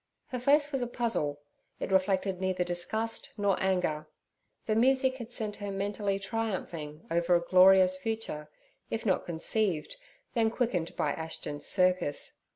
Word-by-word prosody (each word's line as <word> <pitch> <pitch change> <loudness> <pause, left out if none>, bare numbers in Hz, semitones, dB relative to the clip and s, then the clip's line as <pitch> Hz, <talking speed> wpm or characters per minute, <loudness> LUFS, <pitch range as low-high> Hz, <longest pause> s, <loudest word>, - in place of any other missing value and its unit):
Her 250 - -3
face 290 +3 +3
was 270 -2 -1
a 245 - -1
puzzle; 225 - -1 0.4
it - - -4
reflected 190 0 +1
neither 185 -1 0
disgust 200 +6 -3
nor 200 -2 +2
anger. 180 -5 0 0.6
The 220 - +1
music 260 +2 +4
had 235 -2 -8
sent 215 -4 -3
her 205 -1 -5
mentally 200 0 -1
triumphing 190 -7 -4
over 170 +1 +3
a - - +5
glorious 185 0 +6
future, 220 -8 -4 0.4
if 225 - -3
not 190 -4 +1
conceived, 170 - -1 0.4
then 225 -2 +3
quickened 220 -8 -1
by - - 0
Ashton's 160 -2 -5
circus. 180 -6 +1
195 Hz, 145 wpm, -30 LUFS, 175-225 Hz, 0.6 s, glorious